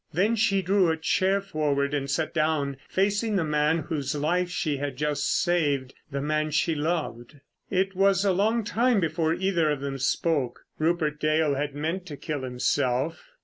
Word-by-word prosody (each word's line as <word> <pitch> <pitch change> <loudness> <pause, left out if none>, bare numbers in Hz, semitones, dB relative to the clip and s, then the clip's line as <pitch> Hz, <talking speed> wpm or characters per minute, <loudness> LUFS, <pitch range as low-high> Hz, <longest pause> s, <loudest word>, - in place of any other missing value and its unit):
Then 205 +8 +2
she 205 -3 +2
drew 190 -2 +3
a 160 - 0
chair 190 +4 +1
forward 145 -6 -1
and 140 -1 -1
sat 155 +3 -1
down, 155 -4 0
facing 205 +3 +1
the 185 - +2
man 150 +1 +2
whose 140 -3 -3
life 175 +5 0
she 155 -5 -1
had 140 0 -3
just 150 -1 0
saved, 145 -7 0 0.2
the 140 -1 -3
man 155 +1 0
she 160 +2 +1
loved. 150 -4 -3 0.3
It 195 0 0
was 195 0 +3
a 195 - +4
long 220 +5 +1
time 235 +2 +2
before 160 -1 0
either 180 -4 +1
of 150 -2 0
them 135 0 -4
spoke. 140 -1 0 0.2
Rupert 155 -2 0
Dale 155 -1 +2
had 140 0 -2
meant 165 +5 -3
to 145 -4 -7
kill 150 -2 -4
himself. 130 - -1
155 Hz, 175 wpm, -26 LUFS, 145-185 Hz, 0.3 s, a